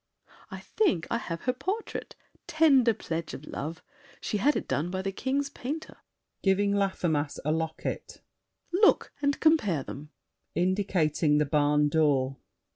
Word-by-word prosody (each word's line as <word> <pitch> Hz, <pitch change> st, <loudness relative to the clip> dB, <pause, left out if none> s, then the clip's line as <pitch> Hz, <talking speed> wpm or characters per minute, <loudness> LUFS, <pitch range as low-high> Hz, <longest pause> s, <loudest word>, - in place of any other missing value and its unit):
I -, -, -8 dB
think 210 Hz, -, +1 dB
I 235 Hz, -, +1 dB
have 165 Hz, -6 st, -5 dB
her 250 Hz, -, 0 dB
portrait—tender 310 Hz, -, 0 dB
pledge 165 Hz, -2 st, -4 dB
Of 145 Hz, -, -10 dB
love! 155 Hz, +3 st, -6 dB, 0.4 s
She 210 Hz, -, -2 dB
had 285 Hz, +8 st, +3 dB
it -, -, -3 dB
done 140 Hz, +6 st, -1 dB
by 185 Hz, +1 st, -3 dB
the 195 Hz, -, -1 dB
King's 275 Hz, +7 st, -1 dB
painter. 295 Hz, +4 st, -6 dB, 0.4 s
[Giving 200 Hz, +1 st, +2 dB
Laffemas 175 Hz, -7 st, 0 dB
a 155 Hz, -, +2 dB
locket. 160 Hz, 0 st, -3 dB, 0.5 s
Look 410 Hz, +4 st, +4 dB
and 285 Hz, -1 st, +1 dB
compare 215 Hz, -, +3 dB
them. 145 Hz, +3 st, -9 dB, 0.5 s
[Indicating 175 Hz, -5 st, +2 dB
the 150 Hz, -, +3 dB
barn 150 Hz, 0 st, +3 dB
door. 140 Hz, -3 st, +2 dB
185 Hz, 135 wpm, -28 LUFS, -, 0.5 s, Look